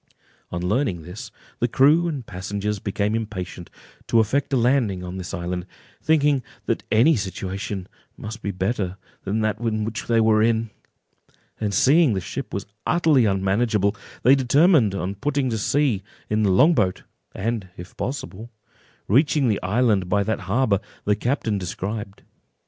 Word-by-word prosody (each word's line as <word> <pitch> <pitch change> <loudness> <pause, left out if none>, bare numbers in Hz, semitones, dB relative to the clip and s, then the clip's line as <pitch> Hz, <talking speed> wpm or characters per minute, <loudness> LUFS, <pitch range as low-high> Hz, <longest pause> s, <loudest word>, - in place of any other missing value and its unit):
On 85 0 -4
learning 95 - 0
this, 90 +5 -8 0.3
the 120 - +2
crew 150 +8 +4
and 145 -7 -4
passengers 100 +2 -3
became 100 +1 -1
impatient 95 -6 -5 0.4
to 115 - +3
effect 130 +6 +1
a 135 - +3
landing 120 -7 +1
on 90 +1 -6
this 90 -1 -6
island, 90 +1 -4 0.3
thinking 145 -3 +3 0.2
that - - 0
any 125 +9 +5
situation 95 -1 -4 0.3
must 110 +1 -7
be - - -3
better 95 0 -2 0.3
than 105 +3 0
that 110 -1 0
which 110 -1 -2
they 115 -1 +3
were 110 -1 +4
in; 115 0 +1 0.9
and 105 -2 -1
seeing 140 - +4
the 95 - 0
ship 95 +9 -6
was 100 - -4 0.2
utterly 160 -8 +4
unmanageable, 100 +1 +1 0.3
they 130 - +7
determined 135 - +4
on 95 0 -2
putting 135 +4 -1
to 110 - -1
sea 130 -3 +1 0.3
in 110 0 +2
the 105 - +3
long 145 - +5
boat, 95 - 0 0.3
and, 105 -2 -2
if 90 +1 -10
possible, 120 -4 -5 0.6
reaching 140 - +3
the 105 - 0
island 100 -2 +1
by 100 +1 +2
that 110 +2 -1
harbour 110 -3 +2 0.3
the 105 - +3
captain 110 -2 -1
described. 100 +3 -5
110 Hz, 155 wpm, -23 LUFS, 95-125 Hz, 0.9 s, they